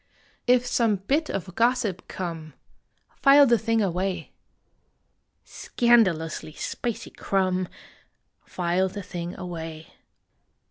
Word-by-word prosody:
If 250 Hz, 0 st, +4 dB
some 230 Hz, -3 st, +2 dB
bit 275 Hz, -, -1 dB
of 185 Hz, -1 st, -4 dB
gossip 230 Hz, -5 st, 0 dB
come, 165 Hz, -5 st, -6 dB, 0.6 s
File 280 Hz, +1 st, +7 dB
the 235 Hz, -3 st, +3 dB
thing 225 Hz, -1 st, +1 dB
away. 185 Hz, 0 st, -2 dB, 1.1 s
Scandalously 185 Hz, -11 st, +1 dB
spicy 235 Hz, +7 st, -4 dB
crumb, 185 Hz, -2 st, 0 dB, 0.8 s
File 180 Hz, +1 st, 0 dB
the 200 Hz, +1 st, -7 dB
thing 175 Hz, -2 st, -6 dB
away. 165 Hz, -3 st, -7 dB
190 Hz, 95 wpm, -25 LUFS, 175-235 Hz, 1.1 s, File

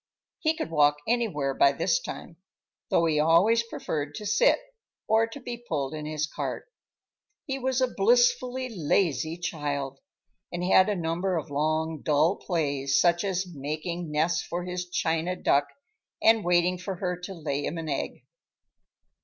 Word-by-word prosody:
He 315 Hz, -1 st, +1 dB
could 240 Hz, -, -4 dB
walk 150 Hz, -2 st, +4 dB
anywhere 200 Hz, -, 0 dB
by 140 Hz, +1 st, +4 dB
this 175 Hz, +5 st, +1 dB
time—though 170 Hz, -1 st, -4 dB
he 155 Hz, -2 st, +2 dB
always 170 Hz, +9 st, +4 dB
preferred 150 Hz, -10 st, -4 dB
to 210 Hz, -, -6 dB
sit, 210 Hz, +1 st, +4 dB, 0.5 s
or 225 Hz, +1 st, +3 dB
to 230 Hz, +5 st, -9 dB
be 245 Hz, -2 st, -6 dB
pulled 140 Hz, -2 st, -1 dB
in 150 Hz, -1 st, -5 dB
his 155 Hz, -1 st, -1 dB
cart. -, -, -5 dB, 0.8 s
He 270 Hz, -3 st, -3 dB
was 260 Hz, 0 st, 0 dB
a 255 Hz, -, +4 dB
blissfully 425 Hz, -, +3 dB
lazy 160 Hz, -2 st, +1 dB
child, 145 Hz, -5 st, -3 dB, 0.5 s
and 175 Hz, 0 st, -3 dB
had 185 Hz, +2 st, +5 dB
a 205 Hz, -, +1 dB
number 175 Hz, +2 st, -1 dB
of 150 Hz, -2 st, -5 dB
long, 155 Hz, +2 st, -1 dB
dull 155 Hz, +5 st, +2 dB
plays, 140 Hz, -6 st, 0 dB
such 175 Hz, +1 st, +3 dB
as 190 Hz, -1 st, -1 dB
making 160 Hz, +2 st, -5 dB
nests 160 Hz, +3 st, +1 dB
for 175 Hz, +1 st, -4 dB
his 180 Hz, 0 st, -4 dB
china 165 Hz, +1 st, 0 dB
duck 145 Hz, -5 st, +2 dB, 0.5 s
and 225 Hz, -1 st, +4 dB
waiting 175 Hz, +1 st, +2 dB
for 190 Hz, +1 st, -4 dB
her 180 Hz, 0 st, -2 dB
to 190 Hz, +2 st, -7 dB
lay 145 Hz, -3 st, -3 dB
him 165 Hz, -, -3 dB
an 165 Hz, -1 st, -5 dB
egg. 140 Hz, -2 st, -3 dB
170 Hz, 155 wpm, -27 LUFS, 150-195 Hz, 0.8 s, had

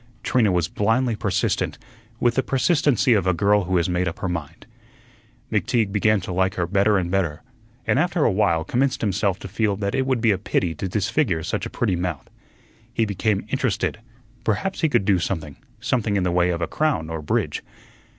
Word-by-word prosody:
Trina 115 Hz, -6 st, +2 dB
was 90 Hz, -3 st, +1 dB
blindly 115 Hz, +5 st, +1 dB
persistent, -, -, -1 dB, 0.4 s
with 120 Hz, -1 st, +3 dB
the 130 Hz, -, +2 dB
persistency 135 Hz, -, +2 dB
of 100 Hz, -4 st, +1 dB
a 90 Hz, -, +3 dB
girl 100 Hz, +2 st, +3 dB
who 90 Hz, 0 st, +1 dB
has 85 Hz, 0 st, +1 dB
made 90 Hz, 0 st, 0 dB
up 85 Hz, -, -4 dB
her -, -, -3 dB
mind. 80 Hz, -5 st, -5 dB, 0.9 s
McTeague 110 Hz, +1 st, +1 dB
began 105 Hz, +1 st, +3 dB
to 90 Hz, -, -5 dB
like 95 Hz, +2 st, +1 dB
her 90 Hz, -, 0 dB
better 100 Hz, +3 st, +3 dB
and 90 Hz, -2 st, -1 dB
better, 90 Hz, -4 st, -1 dB, 0.4 s
and -, -, +2 dB
after 175 Hz, -1 st, +1 dB
a -, -, +4 dB
while 85 Hz, -5 st, +2 dB
commenced 125 Hz, +7 st, 0 dB
himself 100 Hz, -2 st, 0 dB
to -, -, -8 dB
feel 105 Hz, +1 st, 0 dB
that 100 Hz, 0 st, -2 dB
it 135 Hz, 0 st, 0 dB
would 130 Hz, -2 st, +1 dB
be 115 Hz, -1 st, +3 dB
a 95 Hz, -, 0 dB
pity 90 Hz, -4 st, 0 dB
to 95 Hz, +5 st, -4 dB
disfigure 95 Hz, -, 0 dB
such -, -, -2 dB
a -, -, -10 dB
pretty 90 Hz, -, 0 dB
mouth. 85 Hz, -5 st, -3 dB, 0.6 s
He 115 Hz, -1 st, +1 dB
became 100 Hz, 0 st, -1 dB
interested; -, -, -1 dB, 0.4 s
perhaps 190 Hz, -, -1 dB
he 160 Hz, -, +3 dB
could 100 Hz, -, +2 dB
do 95 Hz, -3 st, +3 dB
something, 80 Hz, -4 st, -3 dB, 0.2 s
something 115 Hz, -5 st, 0 dB
in 95 Hz, -, +1 dB
the 90 Hz, -, +1 dB
way 90 Hz, 0 st, +2 dB
of 85 Hz, -1 st, -1 dB
a -, -, -1 dB
crown 140 Hz, -, -1 dB
or 80 Hz, -1 st, -4 dB
bridge. 75 Hz, -, -1 dB
100 Hz, 200 wpm, -23 LUFS, 90-115 Hz, 0.9 s, a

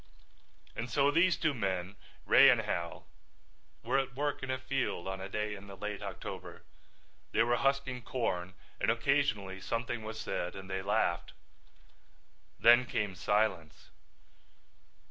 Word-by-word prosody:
And 120 Hz, +2 st, -4 dB
so 140 Hz, +5 st, +3 dB
these 170 Hz, +4 st, +4 dB
two 155 Hz, -2 st, +1 dB
men, 95 Hz, -4 st, -2 dB, 0.3 s
Ray 140 Hz, +1 st, +8 dB
and 120 Hz, -3 st, +4 dB
Hal, 85 Hz, -5 st, -4 dB, 0.8 s
were 125 Hz, +4 st, +2 dB
at 135 Hz, -2 st, -3 dB
work 145 Hz, +1 st, -1 dB
in 135 Hz, -, -5 dB
a 130 Hz, -, 0 dB
field 130 Hz, -8 st, -2 dB
on 95 Hz, 0 st, -4 dB
a 95 Hz, -, -6 dB
day 105 Hz, +1 st, -2 dB
in 100 Hz, 0 st, -10 dB
the 100 Hz, -1 st, -10 dB
late 105 Hz, +1 st, -4 dB
October. -, -, -7 dB, 0.7 s
They 115 Hz, -, +4 dB
were 120 Hz, +1 st, +2 dB
husking 135 Hz, -2 st, 0 dB
corn 95 Hz, -7 st, -2 dB, 0.2 s
and -, -, +1 dB
occasionally 110 Hz, -6 st, +1 dB
something 115 Hz, +4 st, -2 dB
was 110 Hz, 0 st, -6 dB
said 90 Hz, -, -3 dB
and 95 Hz, 0 st, -8 dB
they 95 Hz, 0 st, -1 dB
laughed. 95 Hz, -3 st, 0 dB, 1.3 s
Then 120 Hz, +2 st, +6 dB
came 105 Hz, -4 st, -1 dB
silence. 95 Hz, -5 st, -1 dB
110 Hz, 145 wpm, -32 LUFS, 95-130 Hz, 1.3 s, Ray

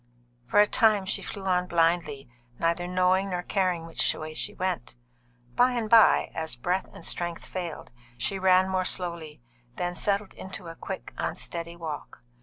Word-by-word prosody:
For 205 Hz, -, +3 dB
a 210 Hz, -, +8 dB
time 215 Hz, -3 st, +3 dB
she 190 Hz, -, +1 dB
flew 200 Hz, -2 st, -7 dB
on 180 Hz, -1 st, +1 dB
blindly, 165 Hz, -5 st, +1 dB, 0.3 s
neither 170 Hz, +1 st, 0 dB
knowing 185 Hz, +2 st, +2 dB
nor 180 Hz, -1 st, -2 dB
caring 180 Hz, -4 st, 0 dB
which 165 Hz, -, 0 dB
way 155 Hz, 0 st, -6 dB
she 200 Hz, -, 0 dB
went. 185 Hz, -12 st, -3 dB, 0.6 s
By 250 Hz, +1 st, +4 dB
and 235 Hz, -3 st, -1 dB
by, 230 Hz, -1 st, +6 dB
as 160 Hz, -4 st, -3 dB
breath 180 Hz, +10 st, -1 dB
and -, -, -10 dB
strength 175 Hz, -1 st, -2 dB
failed, 175 Hz, -7 st, -6 dB, 0.3 s
she 190 Hz, +11 st, -1 dB
ran 185 Hz, 0 st, +5 dB
more 190 Hz, -1 st, 0 dB
slowly, 170 Hz, -7 st, -2 dB, 0.3 s
then 175 Hz, 0 st, -2 dB
settled 200 Hz, +2 st, 0 dB
into 185 Hz, -1 st, -8 dB
a 165 Hz, -, -8 dB
quick, -, -, -7 dB
unsteady 170 Hz, 0 st, -3 dB
walk. 155 Hz, -7 st, -7 dB
180 Hz, 165 wpm, -27 LUFS, 165-190 Hz, 0.6 s, a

